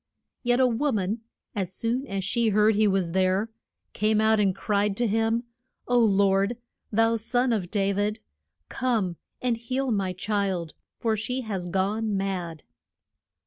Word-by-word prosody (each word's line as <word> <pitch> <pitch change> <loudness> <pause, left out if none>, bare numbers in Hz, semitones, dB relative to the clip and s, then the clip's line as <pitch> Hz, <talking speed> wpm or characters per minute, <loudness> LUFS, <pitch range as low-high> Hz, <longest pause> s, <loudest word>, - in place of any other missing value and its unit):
Yet 245 0 +2
a 260 - +5
wo 255 +4 +1
man, 210 +1 -1 0.3
as 190 -4 -2
soon 245 +4 -1
as 195 -3 -3
she 230 +4 +1
heard 210 +1 +4
he 215 +1 +3
was 190 -4 +1
there, 190 +4 +1 0.4
came 215 0 +2
out 220 0 +4
and 195 -3 +2
cried 205 0 0
to 240 - +1
him, 225 +2 +1 0.4
O 245 0 +3
Lord, 200 0 +3 0.3
thou 225 +1 +3
Son 245 +2 +1
of 190 -6 -2
Da 200 -1 +1
vid, 205 +2 -1 0.5
come 215 -9 -1 0.3
and 245 -2 +2
heal 255 +3 -2
my 195 -3 0
child, 190 -4 -2 0.2
for 225 -2 0
she 250 +5 -2
has 195 -6 -4
gone 200 +3 0
mad. 180 -5 -3
210 Hz, 155 wpm, -26 LUFS, 195-230 Hz, 0.5 s, a